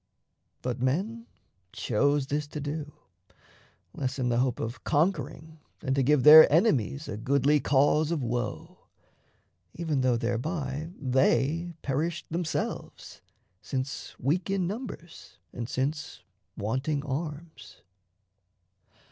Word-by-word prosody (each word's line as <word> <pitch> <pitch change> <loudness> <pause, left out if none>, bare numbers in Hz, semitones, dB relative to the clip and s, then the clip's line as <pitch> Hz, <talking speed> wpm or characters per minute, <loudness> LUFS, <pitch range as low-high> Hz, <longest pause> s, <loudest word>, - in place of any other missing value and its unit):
But 125 -1 -3
men 200 - -1 0.5
chose 140 +5 +1
this 145 +2 -2
to 150 - -6
do 145 +1 -4 1.0
Less 130 -1 -3
in 125 -2 0
the 120 0 +1
hope 125 -1 0
of 115 +1 -5
conquering 160 0 -1 0.2
than 135 -2 -1
to 135 - +2
give 140 0 +3
Their 155 0 +10
enemies 150 - +2
a 105 - -5
goodly 140 +5 +2
cause 145 +3 +3
of 165 -5 -1
woe, 120 0 -4 1.0
Even 160 -5 -1
though 125 -2 +2
thereby 135 +5 -3
they 145 +5 +1
perished 155 +4 -2
themselves, 170 -1 -4 0.4
Since 130 +2 -4
weak 165 +9 -1
in 195 -2 0
numbers 195 -4 -7 0.2
and 120 0 -5
since 145 +4 -3 0.3
wanting 130 +7 -1
arms. 150 -5 -6
145 Hz, 115 wpm, -28 LUFS, 130-160 Hz, 1.0 s, Their